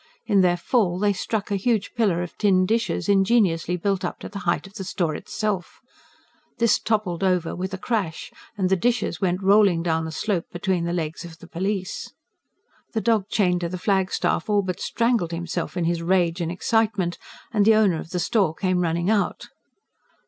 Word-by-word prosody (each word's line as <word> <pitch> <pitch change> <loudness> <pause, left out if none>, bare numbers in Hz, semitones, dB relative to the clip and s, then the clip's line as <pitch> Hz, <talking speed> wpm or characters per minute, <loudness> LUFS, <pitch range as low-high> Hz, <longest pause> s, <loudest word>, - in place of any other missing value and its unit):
In 205 -4 +3
their 175 -1 +3
fall 180 -1 +1
they 205 +1 +2
struck 205 +1 -3
a - - +2
huge 205 +1 0
pillar 200 -8 +1
of 175 - -8
tin 190 -3 +4
dishes, 225 +3 0
ingeniously 195 -4 +2
built 195 +1 -1
up 175 - -3
to - - -7
the 200 - -6
height - - 0
of 195 - -13
the 200 -2 -6
store 175 -3 -1
itself. 200 +2 -3 0.8
This 235 -2 +3
toppled 205 -5 -1
over 180 -3 +1
with 185 +2 -4
a 190 - -4
crash, 195 -7 -3 0.3
and 185 -2 +1
the 190 - +4
dishes 235 -3 0
went 185 0 0
rolling 195 -4 +4
down 160 -1 0
the 160 - -5
slope 180 +1 -1
between 175 -1 -1
the 170 - -1
legs 165 -1 -3
of 165 -2 -10
the - - -13
police. 190 +2 -3 0.8
The 220 - 0
dog 220 -4 +1
chained 180 -4 +1
to 170 - -2
the 185 - -4
flagstaff 190 -1 0
all 205 -1 +3
but 185 -2 -4
strangled 230 -8 0
himself 170 +1 -4
in 175 - 0
his 170 0 0
rage 175 0 +1
and 165 0 -2
excitement; 200 -2 0 0.3
and 210 -3 +3
the 220 +1 +6
owner 200 -7 +3
of - - -8
the 180 - -3
store 180 -2 +1
came 185 -1 0
running 170 0 0
out. 210 -2 -1
185 Hz, 190 wpm, -24 LUFS, 175-205 Hz, 0.8 s, the